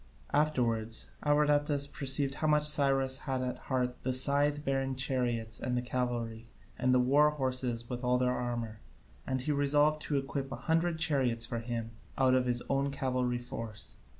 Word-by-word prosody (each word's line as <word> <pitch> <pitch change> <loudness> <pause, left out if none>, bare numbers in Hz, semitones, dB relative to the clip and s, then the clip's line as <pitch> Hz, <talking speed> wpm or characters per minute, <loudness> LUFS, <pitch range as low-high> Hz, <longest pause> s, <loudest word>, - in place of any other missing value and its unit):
Afterwards 120 -7 0
Abradatas 145 -1 +3
perceived 140 -1 -1
how 155 - +2
much 150 0 +3
Cyrus 135 -3 +2
had 130 -1 0
at 125 0 -3
heart 125 -2 -1
the 130 - -1
scythe 145 +3 +3
bearing 135 -1 -1
chariots 125 -4 -2
and 125 0 -2
the - - +1
cavalry 120 -3 -3 0.3
and 130 0 +1
the 125 - +4
war 140 +4 +4
horses 130 -5 -2
with 125 0 -5
their 125 0 +2
armour, 120 -3 -4 0.5
and 130 -1 -1
he 150 - -1
resolved 145 +2 +2
to 145 - -1
equip 135 0 -3
a - - -3
hundred 165 0 +1
chariots 135 -7 0
for 120 0 -4
him 115 -1 -4 0.3
out 130 -1 +4
of 130 -1 +2
his 120 0 0
own 140 0 +1
cavalry 130 -3 -1
force. 115 -3 -8
130 Hz, 165 wpm, -31 LUFS, 125-145 Hz, 0.5 s, the